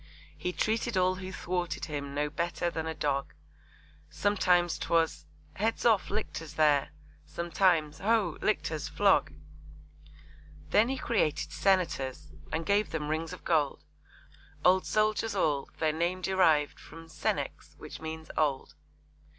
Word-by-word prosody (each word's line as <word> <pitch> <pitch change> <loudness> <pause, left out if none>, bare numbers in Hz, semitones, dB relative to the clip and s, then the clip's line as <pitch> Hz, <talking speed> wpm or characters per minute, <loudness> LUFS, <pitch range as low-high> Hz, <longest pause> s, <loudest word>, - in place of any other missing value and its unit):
He 180 - -3
treated 225 +2 0
all 185 0 +3
who 185 0 -6
thwarted 180 -1 -3
him 140 -2 -5
No 150 +1 +1
better 170 +2 -1
than 160 -1 -3
a 160 - -3
dog, 140 -2 -1 0.7
Sometimes 180 -4 +2
'twas 165 -1 0 0.3
'Heads 225 +4 -1
off, 220 -4 +4
Lictors, 165 -7 -4
there!' 150 -3 +3 0.4
Sometimes 170 -3 +1
'Ho! 225 +3 +2
Lictors, - - -1
flog!' - - +3 1.4
Then 220 +4 +4
he 270 - -1
created 155 - 0
Senators, 175 -9 0 0.2
And 160 +1 -2
gave 205 +1 +2
them 150 -2 -3
rings 160 +1 -2
of - - -9
gold; 150 -4 +1 0.8
Old 185 +1 +4
soldiers 215 0 +1
all; 150 -7 0
their 155 -1 +1
name 175 +3 -1
deriv'd 165 -6 +3
From 165 0 -12
'Senex' 160 - -3
which - - -9
means 160 0 -6
'old.' 145 -4 0
170 Hz, 130 wpm, -30 LUFS, 155-190 Hz, 1.4 s, off